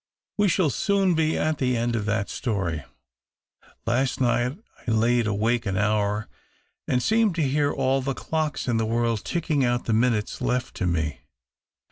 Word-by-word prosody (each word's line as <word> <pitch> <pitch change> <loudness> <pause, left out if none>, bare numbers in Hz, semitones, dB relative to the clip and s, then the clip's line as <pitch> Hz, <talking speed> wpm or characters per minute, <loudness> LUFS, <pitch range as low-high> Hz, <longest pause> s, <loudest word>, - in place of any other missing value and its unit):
"We 205 -1 +3
shall 175 -4 +2
soon 195 - +2
be 160 -1 +1
at 155 -1 0
the 125 -2 +1
end 120 +1 0
of 105 -3 -1
that 110 -1 0
story. 95 - -2 1.0
Last 125 +3 0
night 120 +2 +1 0.3
I - - 0
laid 115 +1 +2
awake 110 +3 0
an 95 -1 -1
hour 105 +1 +1 0.6
and 125 -1 +1
seemed 220 -4 +2
to 165 - +1
hear 145 +1 +1
all 135 0 +1
the 135 0 -2
clocks 155 -4 -2
in 120 -2 +1
the 110 - +1
world 115 -2 0
tickino^ 160 -5 0
out 120 0 0
the 115 - 0
minutes 110 -2 +1
left 125 0 -1
to 95 - 0
me. 80 -5 -1
120 Hz, 170 wpm, -25 LUFS, 110-145 Hz, 1.0 s, We